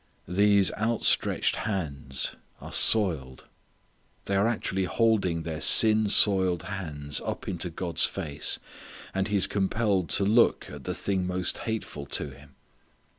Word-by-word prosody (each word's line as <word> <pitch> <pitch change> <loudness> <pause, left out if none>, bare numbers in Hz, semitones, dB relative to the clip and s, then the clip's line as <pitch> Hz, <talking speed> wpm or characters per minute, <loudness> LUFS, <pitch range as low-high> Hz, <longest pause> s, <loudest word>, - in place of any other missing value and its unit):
These 100 +2 +3
outstretched 115 +1 +1
hands 70 -10 -3 0.2
are - - -10
soiled! 80 -12 +2 0.8
They 100 - -2
are 100 +3 +2
actually 95 -4 -1
holding 95 -6 0
their 80 -1 -5
sin 110 +2 +5
soiled 95 -5 +3
hands 75 -8 -4
up - - -5
into 90 -1 -3
God's 85 -1 0
face; 75 -1 -3 0.6
and 95 0 -1
He 105 - -2
is 100 - +5
compelled 100 -2 -1
to 100 - 0
look 115 +4 +2
at - - -10
the - - -3
thing 95 -2 -2
most 90 -1 -3
hateful 75 -10 -5
to 75 +3 -2
Him. 70 +1 -17
95 Hz, 135 wpm, -26 LUFS, 80-105 Hz, 0.8 s, sin